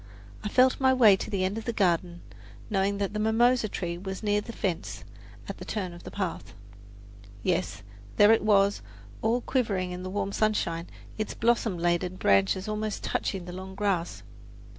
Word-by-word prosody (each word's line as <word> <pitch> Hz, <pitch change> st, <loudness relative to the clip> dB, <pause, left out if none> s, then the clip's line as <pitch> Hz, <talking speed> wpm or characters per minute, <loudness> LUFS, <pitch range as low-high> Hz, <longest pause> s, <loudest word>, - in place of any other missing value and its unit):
I 210 Hz, -, -2 dB
felt 255 Hz, +3 st, +4 dB
my 260 Hz, -1 st, +4 dB
way 220 Hz, -6 st, +7 dB
to -, -, -5 dB
the 195 Hz, -2 st, -1 dB
end 200 Hz, +4 st, -2 dB
of 225 Hz, -, -10 dB
the 235 Hz, -, -1 dB
garden, 175 Hz, -3 st, 0 dB, 0.5 s
knowing 200 Hz, 0 st, +1 dB
that 200 Hz, 0 st, -2 dB
the 210 Hz, -, -2 dB
mimosa 225 Hz, +1 st, +3 dB
tree 175 Hz, -2 st, -4 dB
was 190 Hz, +2 st, -6 dB
near 205 Hz, 0 st, +2 dB
the 230 Hz, -, -8 dB
fence, 185 Hz, -6 st, -3 dB, 0.4 s
at -, -, -6 dB
the -, -, -7 dB
turn 185 Hz, -5 st, -3 dB
of 175 Hz, -, -12 dB
the -, -, -6 dB
path. 190 Hz, -, -4 dB, 0.9 s
Yes, 95 Hz, +3 st, -1 dB, 0.3 s
there 205 Hz, +1 st, +7 dB
it 225 Hz, -, +4 dB
was, 200 Hz, -1 st, +3 dB, 0.4 s
all 230 Hz, +3 st, +1 dB
quivering 200 Hz, -9 st, -1 dB
in 180 Hz, 0 st, -5 dB
the 185 Hz, -, -5 dB
warm 200 Hz, 0 st, -2 dB
sunshine, 175 Hz, -6 st, 0 dB, 0.3 s
its 215 Hz, -, -3 dB
blossom 230 Hz, -4 st, +1 dB
laden 175 Hz, +2 st, 0 dB
branches 100 Hz, -, +2 dB
almost 215 Hz, 0 st, -3 dB
touching 190 Hz, -3 st, -2 dB
the 175 Hz, -, -7 dB
long 190 Hz, +1 st, -8 dB
grass. 195 Hz, -4 st, -1 dB
200 Hz, 180 wpm, -27 LUFS, 180-215 Hz, 0.9 s, way